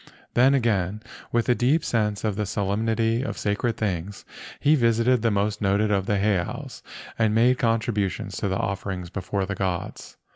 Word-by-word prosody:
Then 130 +3 +5
again, 105 -4 0 0.3
with 120 -1 +1
a 125 - +5
deep 135 +7 +1
sense 105 -3 0
of 105 -3 0
the 105 0 -2
solemnity 110 +3 0
of 135 - -4
sacred 105 +3 -1
things, 100 -1 -3 0.3
he 150 - +4
visited 120 -2 +3
the 115 - +2
most 105 0 0
noted 105 +2 +2
of 95 -2 0
the 105 - +1
heiaus 100 -3 -2 0.4
and 110 -1 +2
made 125 +2 +4
contributions 110 -4 -1
to - - -1
the 95 -1 -1
offerings 95 -2 -3
before 95 +1 -2
the 100 - -3
gods. 95 -3 -4
105 Hz, 170 wpm, -25 LUFS, 100-115 Hz, 0.4 s, Then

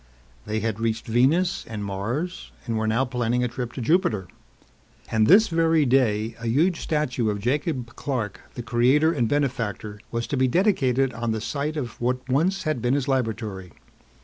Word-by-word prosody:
They 110 0 -1
had 110 -1 -2
reached 115 -1 -1
Venus 155 +11 +2
and 105 -2 -5
Mars 115 - -4
and 115 -2 -2
were 110 0 0
now 115 +4 +2
planning 125 -1 0
a - - +2
trip 120 0 -5
to 130 - -5
Jupiter. 120 - +1 0.8
And 110 -1 +3
this 210 +6 +7
very 165 -2 +2
day, 115 -4 +2
a 115 - -5
huge 160 +9 +2
statue 130 -7 -1
of 105 - -1
Jacob 125 - -2
Clark, 115 -8 -3
the 120 - -5
creator 130 +7 +3
and 120 -8 0
benefactor, 115 -7 -2
was 115 0 -2
to 140 - -3
be 130 0 +3
dedicated 135 - +2
on 115 -1 -2
the 110 - -2
site 145 +7 -3
of 120 -6 -5
what 125 +1 -1
once 165 +9 +1
had 155 -7 -1
been 125 +3 +1
his 140 -1 -1
laboratory. 110 - -2
125 Hz, 175 wpm, -24 LUFS, 115-145 Hz, 0.8 s, this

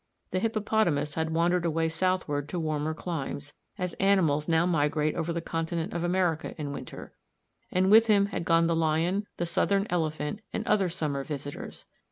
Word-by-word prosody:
The 185 - 0
hippopotamus 210 -9 +1
had 160 +1 -1
wandered 170 +2 +2
away 165 -1 +1
southward 160 -4 -1
to 180 - -2
warmer 155 -1 -1
climes, 145 -4 -5 0.2
as 180 -3 -3
animals 170 -7 +3
now 165 0 +3
migrate 155 -2 +1
over 165 0 -2
the 170 0 -2
continent 165 +2 -3
of 170 0 -2
America 175 -2 0
in 145 -2 -3
winter, - - -8 0.6
and 185 +2 +2
with 225 +1 +7
him 205 -2 +5
had 200 -4 -3
gone 165 0 +4
the 165 0 +2
lion, 165 +5 +1
the 175 - -1
southern 195 +4 +1
elephant, 155 0 -1
and 220 - -3
other 195 -4 +2
summer 150 -6 -2
visitors. 145 -1 -7
165 Hz, 170 wpm, -28 LUFS, 155-185 Hz, 0.6 s, with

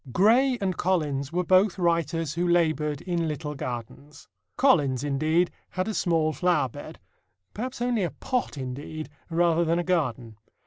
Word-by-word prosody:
Gray 245 - +4
and 190 -2 -1
Collins 150 -6 0
were 180 +2 0
both 185 +2 +3
writers 165 -3 0
who 175 +2 -1
labored 155 -4 +1
in 170 -3 -1
little 150 0 -4
gardens. 130 +2 -7 0.3
Collins, 145 - +3
indeed, 155 +5 +1 0.2
had 185 +1 -2
a 220 - -2
small 165 -5 +1
flower 165 -7 +1
bed - - -10 0.5
perhaps 245 +2 -4
only 245 -3 +1
a 175 - 0
pot, 250 - -3
indeed 140 +4 -6 0.2
rather 170 0 +2
than 165 +1 +1
a 175 - 0
garden. 125 - -1
165 Hz, 150 wpm, -26 LUFS, 145-180 Hz, 0.5 s, Gray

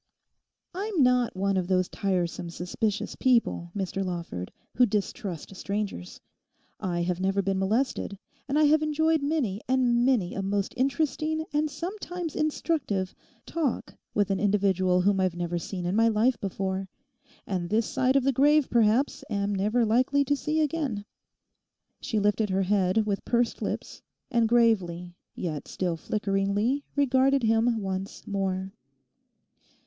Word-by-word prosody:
'I'm 385 -4 0
not 250 -3 +3
one 195 0 +1
of 180 -2 -1
those 185 -1 +2
tiresome, 175 -3 -2
suspicious 195 +5 -2
people, 235 -9 +2
Mr 195 0 -2
Lawford, 170 - -5 0.2
who 250 0 +4
distrust 200 - -3
strangers. 200 - -4 0.6
I 175 -2 -1
have 175 0 -1
never 195 +1 +1
been 195 0 0
molested, 205 0 0 0.3
and 280 - +1
I 305 - +5
have 305 +1 +5
enjoyed 315 +1 +2
many 280 -9 -1
and 250 -2 +3
many 245 -9 +2
a 195 - -3
most 200 0 -1
interesting, 305 +4 0
and 300 +1 +1
sometimes 355 -1 -5
instructive, 290 - -1 0.3
talk 310 -7 -2 0.2
with 205 -1 +2
an 195 - 0
individual 190 -3 +2
whom 195 +1 +2
I've 185 -2 +1
never 175 0 -2
seen 180 +1 -5
in 180 +3 0
my 225 +1 +4
life 225 +3 +2
before, 190 0 -3 0.6
and 180 -3 -3
this 220 +2 +2
side 260 +4 +1
of 275 - +4
the 275 - +3
grave 290 +2 +4
perhaps, 235 +4 +2
am 200 -1 -1
never 215 +5 +1
likely 255 +6 +2
to 285 - +2
see 305 +2 0
again.' 285 -9 -1 0.9
She 235 -6 -2
lifted 210 +1 +1
her 190 +1 +1
head 195 +2 +2
with 200 -2 -2
pursed 240 -1 0
lips, - - -4 0.3
and 235 -2 +2
gravely 185 -7 +2 0.2
yet 155 -5 -4
still 180 -3 -2
flickeringly 205 - 0
regarded 270 -1 +3
him 225 +1 +2
once 190 +1 -4
more. 190 -1 -2
210 Hz, 145 wpm, -27 LUFS, 190-260 Hz, 0.9 s, I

